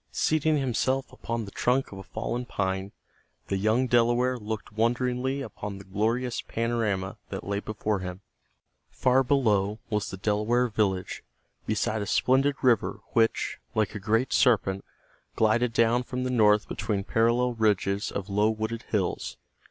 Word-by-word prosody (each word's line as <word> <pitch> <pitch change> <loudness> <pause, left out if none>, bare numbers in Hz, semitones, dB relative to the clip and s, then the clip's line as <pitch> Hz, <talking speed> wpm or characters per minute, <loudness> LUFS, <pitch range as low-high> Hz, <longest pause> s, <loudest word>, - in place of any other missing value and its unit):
Seating 155 0 +2
himself 130 0 0
upon 115 -3 -4
the 100 - -10
trunk 130 +5 +1
of 95 - -8
a - - -8
fallen 120 +4 -3
pine 95 -4 -2 0.6
the 100 - 0
young 110 +6 +2
Delaware 120 +1 +3
looked 110 -2 -5
wonderingly 125 +4 0
upon 105 -6 -6
the 100 - -10
glorious 115 +5 -1
panorama 110 -5 -2
that - - -5
lay 100 0 -2
before 105 -1 -2
him. 90 0 -6 0.7
Far 130 +1 +3
below 110 -7 +2
was 105 -1 0
the 95 - -6
Delaware 110 +5 +1
village 95 -4 -1 0.4
beside 110 -1 0
a 100 - -3
splendid 135 +6 +3
river 125 -3 +2
which, 115 -1 +1 0.2
like 110 -1 +1
a 105 - -5
great 110 +5 +1
serpent, 100 -6 +3 0.5
glided 115 +2 +2
down 115 +1 +3
from 125 +1 -4
the 130 - -1
north 105 -3 +4
between 100 -3 -2
parallel 120 +3 +2
ridges 105 -2 +1
of 100 -1 -4
low 105 +2 +2
wooded 110 +1 -3
hills. 95 -5 -1
110 Hz, 150 wpm, -27 LUFS, 105-125 Hz, 0.7 s, north